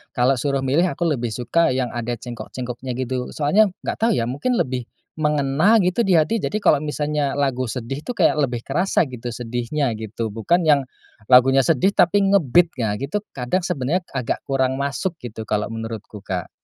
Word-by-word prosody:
kalau 125 +1 +2
suruh 140 +1 -1
milih 150 +8 +2
aku 175 - -3
lebih 125 -9 -1
suka 165 +7 +1
yang 130 -2 -1
ada 120 0 -3
cengkok-cengkoknya 125 +1 -6
gitu. 130 0 -3
Soalnya 190 +9 +4 0.2
nggak - - -3
tahu 235 - +3
ya - - 0
mungkin 140 - -1
lebih 125 - -1 0.3
mengena 150 +6 +2
gitu 185 +2 +2
di 195 -6 +3
hati, 160 +8 +1
jadi 210 - -1
kalau 150 -8 +3
misalnya 150 -1 -1
lagu 130 -3 0
sedih 125 +4 -4
tuh 245 +8 -6
kayak - - +4
lebih 125 -6 -1
kerasa 180 -2 +1
gitu 125 -3 -7
sedihnya 120 +3 -2
gitu 110 0 -5
bukan 170 +11 +1
yang, 145 -3 +5 0.5
lagunya 130 +1 +6
sedih 165 +7 +2
tapi 195 +3 +3
nge-beat 175 -1 +4
ah, 105 -2 0
gitu 140 - -3
kadang 130 +9 -2
sebenarnya 155 +2 -1
agak 130 -5 -3
kurang 130 -1 0
masuk 140 +6 -2
gitu 110 -2 -7
kalau 105 0 -1
menurutku, 115 -2 -6
Kak. 90 -3 -3
135 Hz, 175 wpm, -21 LUFS, 120-155 Hz, 0.5 s, lagunya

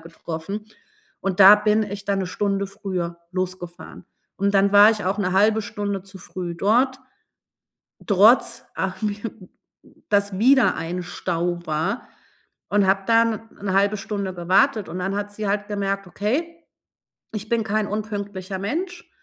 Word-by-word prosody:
getroffen 165 +4 -6 0.6
und 195 -1 -2
da 195 +2 +11
bin 210 +1 +2
ich 205 -1 -6
dann 200 -1 0
1 190 - -2
Stunde 200 +1 -1
früher 190 -4 -4
losgefahren 185 -1 -5 0.3
und 200 +1 0
dann 195 0 +4
war 205 +1 +8
ich 215 -3 -3
auch 190 +3 -1
'ne 185 -3 0
1/2 210 +3 +4
Stunde 200 -1 -4
zu 195 0 -13
früh 180 -1 -6
dort, 245 +9 +2 1.1
trotz 225 +4 +4
ach, 190 +1 -3
mir 210 -1 -1 0.9
dass 200 -2 +1
wieder 260 +3 +4
ein 175 +2 -4
Stau 175 0 -2
war 160 +8 -2 0.6
und 205 -1 +2
habe 195 +1 +2
da 230 0 +5
'ne 225 -3 -4
1/2 200 +2 +3
Stunde 200 -1 -4
gewartet 190 +5 +2
und 180 - -5
dann 195 +2 -2
hat 205 0 -4
sie 210 -1 -3
halt 205 +1 -1
gemerkt, 195 -1 -2
okay, 315 - -3 0.7
ich 215 0 -5
bin 235 -1 +1
kein 215 0 -1
unpünktlicher 200 -3 -4
Mensch. 345 - -4
200 Hz, 150 wpm, -23 LUFS, 185-215 Hz, 1.1 s, da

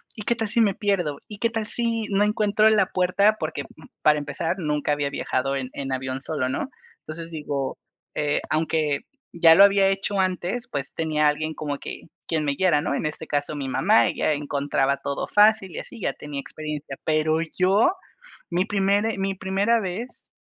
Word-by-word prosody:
¿y 210 - -5
qué 235 - +1
tal 225 -2 -3
si 235 - 0
me 205 -3 +3
pierdo? 185 -8 0
¿Y 210 - -7
qué 230 - +2
tal 225 -2 -3
si 230 -2 0
no 200 +1 +2
encuentro 210 0 +3
la 210 -4 +3
puerta?, 200 +4 +2
porque, 155 -2 -3
uh, 150 +2 -16 0.2
para 150 0 +4
empezar, 165 +5 -3
nunca 150 -2 -1
había 145 -1 -1
viajado 135 0 -1
en 130 -2 -3
en 135 -1 -5
avión 130 0 -3
solo, 140 -4 -2
¿no?, 260 - -3 0.4
entonces, 165 +1 -7
digo, 145 -3 -3 0.4
eh, 150 -1 0
aunque 155 -2 0 0.3
ya 165 -1 +7
lo 195 - +9
había 200 -1 +5
hecho 195 +1 -1
antes, 185 +6 -1
pues 140 -1 -4
tenía 155 -2 +1
alguien 155 +1 -1
como 145 -2 -4
que - - -7 0.2
quien 155 -2 0
me 140 - +1
guiara, 150 -1 +2
¿no?, - - -1
en - - -2
este 155 +1 -6
caso, 145 +1 -1
mi 140 -2 -4
mamá, 115 -3 +4
ella 155 - 0
encontraba 140 -1 0
todo 140 0 -3
fácil 210 -3 +4
y - - -4
así, 240 - -9
ya - - 0
tenía 145 -1 -6
experiencia. 150 -1 -6
Pero 155 0 +2 0.2
yo, 195 - +4 0.6
mi 180 +1 +1
primer 205 +1 +1
mi 195 0 -1
primera 195 +5 +1
vez 205 +6 -6
165 Hz, 190 wpm, -24 LUFS, 145-200 Hz, 0.6 s, lo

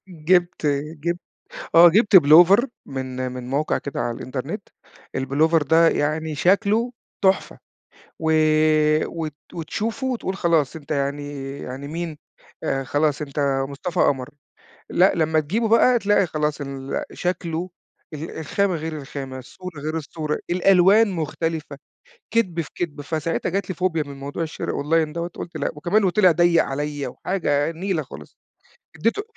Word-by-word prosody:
جِبت 175 -1 +1 0.3
جِبت 170 +3 -2 0.6
آه، 170 +1 +10
جِبت 210 +3 +3
بلوفر 175 - +7 0.2
من 130 -1 -4
من 125 -1 -7
موقع 145 +3 0
كده 140 - -5
على 120 - -2
الإنترنت، 130 - -5 0.5
البلوفر 150 +5 +2
ده 165 +3 +4
يعني 155 +1 -1
شكله 210 +7 +2 0.3
تحفة، 190 0 +1 0.6
و 160 0 0 0.8
وت 160 -3 -5 0.2
وتشوفه 215 - -3
وتقول 230 -7 -2
خلاص 165 -6 +1
أنت 150 -2 -12
يعني 140 -1 -3
يعني 135 +2 -7
مين، 165 -1 -5 0.5
آآ، 135 0 -1
خلاص 145 +2 0
أنت 140 -2 -1
مصطفى 145 +5 -3
قمر، 135 0 +1 0.6
لأ 185 +2 +4
لمّا 160 -1 +2
تجيبه 215 +10 -1
بقى 240 +2 +5
تلاقي 205 -2 +2
خلاص 150 -2 -2
ال 135 -1 -4
شكله 175 0 -3 0.4
ال 155 +3 -6
الخامة 185 +5 0
غير 160 -1 -4
الخامة، 135 -2 -7
الصورة 165 +4 -9
غير 155 +2 -3
الصورة، 155 0 -3
الألوان 195 +4 +5
مختلفة، 160 -3 -3 0.6
كِدب 185 -7 +1
في 160 - -6
كِدب، 155 -4 -4
فساعتها 160 +2 -2
جات 195 +1 -2
لي 185 - -3
فوبيا 165 -2 0
من 140 -1 -9
موضوع 140 +4 -5
الشرا 160 -1 -4
أونلاين 155 +1 +1
دوّة 170 +1 -3
قُلت 170 0 -8
لأ، - - -1
وكمان 175 +8 +1
وطِلع 185 0 +4
ضيّق 170 0 +4
عليَّ 145 +1 -3
وحاجة 155 -5 -1
نيلة 170 -1 -2
خالص، 75 - -12 0.6
إدّيته 230 - 0
160 Hz, 140 wpm, -22 LUFS, 145-180 Hz, 0.8 s, آه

